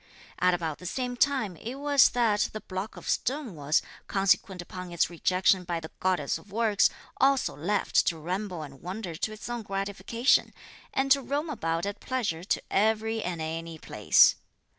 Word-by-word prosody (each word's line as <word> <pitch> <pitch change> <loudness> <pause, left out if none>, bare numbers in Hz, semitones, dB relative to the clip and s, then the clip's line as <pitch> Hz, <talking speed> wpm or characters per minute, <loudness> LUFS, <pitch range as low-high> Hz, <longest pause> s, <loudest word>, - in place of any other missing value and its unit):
At 180 0 +4
about 160 -3 -4
the 180 - -7
same 250 +5 -2
time 250 -8 +1
it 235 +9 -6
was 285 -1 +5
that 225 -4 +2
the 215 - -5
block 190 +3 -5
of - - -10
stone 265 -4 -1
was, 150 0 +1 0.2
consequent 195 0 +1
upon 180 0 -7
its 170 0 +1
rejection 185 +2 +2
by 170 -1 -2
the 160 -1 -9
goddess 180 -7 0
of 200 - -19
works, 215 -1 +3 0.3
also 270 0 +2
left 195 +6 +1
to 165 - +1
ramble 180 +1 -4
and 135 -2 -11
wander 185 +1 -5
to 190 +7 -3
its 215 - -8
own 240 -1 -3
gratification, 200 +5 0 0.4
and 270 0 0
to 275 0 +6
roam 285 +5 -2
about 165 - -1
at 200 0 -4
pleasure 215 -11 -2
to 190 - -1
every 220 +2 +1
and 175 -4 -3
any 165 +1 -5
place. - - +4
195 Hz, 175 wpm, -28 LUFS, 175-235 Hz, 0.4 s, to